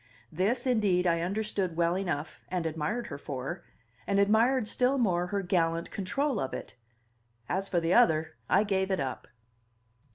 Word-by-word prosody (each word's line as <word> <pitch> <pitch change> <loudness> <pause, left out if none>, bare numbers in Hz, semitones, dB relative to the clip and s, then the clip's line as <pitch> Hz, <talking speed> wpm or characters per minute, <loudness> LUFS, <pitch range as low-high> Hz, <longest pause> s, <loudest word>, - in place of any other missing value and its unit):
This, 215 - 0
indeed, 205 -8 +2
I 170 -1 +2
understood 195 -1 -2
well 170 +1 +2
enough, 160 -6 -3
and 180 -2 -2
admired 160 +9 -2
her 190 - -7
for, 140 +6 -5 0.5
and 200 - +2
admired 220 +4 +3
still 255 +4 +2
more 180 -8 +1
her 200 +1 -2
gallant 170 -2 0
control 260 +6 -1
of 135 - -3
it; - - -8 0.7
as 195 +1 -2
for 175 - +2
the 165 +1 +1
other, 160 -9 +4 0.2
I 195 - +4
gave 190 -2 0
it 190 - 0
up. 135 -2 -4
185 Hz, 160 wpm, -29 LUFS, 165-215 Hz, 0.7 s, other